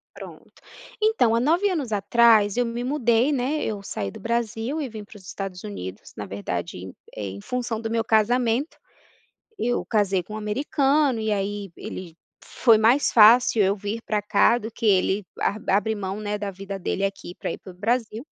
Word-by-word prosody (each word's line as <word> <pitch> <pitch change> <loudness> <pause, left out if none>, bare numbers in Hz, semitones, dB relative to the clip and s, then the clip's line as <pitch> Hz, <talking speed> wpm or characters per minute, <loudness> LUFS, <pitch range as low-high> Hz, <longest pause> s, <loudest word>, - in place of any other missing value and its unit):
Pronto. - - -12 0.5
Então, 430 - +3
há - - +2
9 335 +10 +2
anos 295 - -2
atrás 210 0 +4
eu 245 - +2
me 235 +1 -4
mudei, 250 -1 +2
né, 280 +3 -1
eu 210 -2 -3
saí 100 - -4
do - - -11
Brasil 235 +5 -2
e 270 - -4
vim 215 -1 -8
pros 205 -2 -15
Estados 190 -1 -6
Unidos, 95 -1 -8
na 105 - -5
verdade, 95 -2 -5 0.2
eh, 100 -2 -4
em 100 +1 -8
função 240 - -3
do 225 - -4
meu 225 0 0
casamento. 235 +5 +1 0.8
Eu 245 +1 0
casei 200 -4 +1
com 210 +5 -10
um - - -4
americano 275 +4 +1
e 220 -1 -1
aí 200 0 -3
ele 170 -3 -8 0.3
foi 230 -3 +4
mais 235 +6 +4
fácil 225 0 +6
eu 195 0 +2
vir 210 +3 -4
pra 210 -1 0
cá 210 +3 +3
do 220 -1 -7
que 225 0 -4
ele 195 0 +2 0.2
arbi 205 +2 -1
abre 210 +3 +2
mão, 200 0 -4
né, 210 0 -3
da 205 -1 -3
vida 195 +1 -7
dele 195 +1 -2
aqui 195 -3 -4
pra - - -3
ir - - -7
pro 185 - -12
Brasil. 225 +4 -2
220 Hz, 185 wpm, -24 LUFS, 195-240 Hz, 0.8 s, fácil